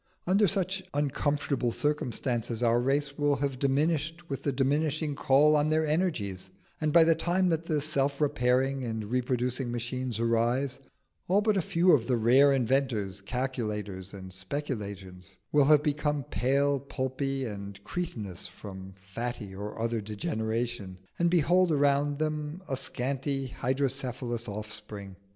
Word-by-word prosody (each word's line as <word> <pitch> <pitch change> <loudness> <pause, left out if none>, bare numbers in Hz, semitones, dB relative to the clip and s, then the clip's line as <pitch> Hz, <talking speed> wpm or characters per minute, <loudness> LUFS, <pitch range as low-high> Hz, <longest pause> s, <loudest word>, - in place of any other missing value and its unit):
Under 195 +3 +4
such 190 0 0
uncomfortable 145 -3 0
circumstances 120 -4 -1
our 120 0 +3
race 140 +3 0
will 145 -1 +3
have 140 -2 -2
diminished 155 +4 0
with 135 - -3
the 140 - 0
diminishing 145 +3 0
call 145 +3 +4
on 150 +1 +2
their 155 0 +2
energies, 135 - -1 0.3
and 155 -1 +1
by 170 +1 +7
the 165 0 +5
time 180 +3 +1
that 165 -1 0
the 155 -2 +1
self 140 -2 0
repairing 135 -1 +1
and 110 -2 -4
reproducing 125 0 0
machines 120 0 -3
arise, 120 +4 +1 0.5
all 195 +3 +4
but 215 0 +2
a 190 - +2
few 175 +2 +3
of 125 -8 +4
the 125 -2 +2
rare 130 +5 +5
inventors, 125 -7 0
calculators, 105 -5 -3
and 95 -2 -9
speculators 100 - -5
will 145 -2 +5
have 150 0 +5
become 150 -1 0
pale, 135 +6 +1
pulpy, 135 0 -2
and 100 -2 -7
cretinous 105 - -5
from 95 -2 -10
fatty 105 +2 -5
or 105 +3 -6
other 115 0 -1
degeneration, 110 -1 -3 0.2
and 170 0 +3
behold 175 +1 +4
around 145 0 +2
them 155 +3 -3
a 135 - -1
scanty 135 +1 -2
hydrocephalous 125 -2 -2
offspring. 105 -2 -7
135 Hz, 140 wpm, -29 LUFS, 115-150 Hz, 0.5 s, by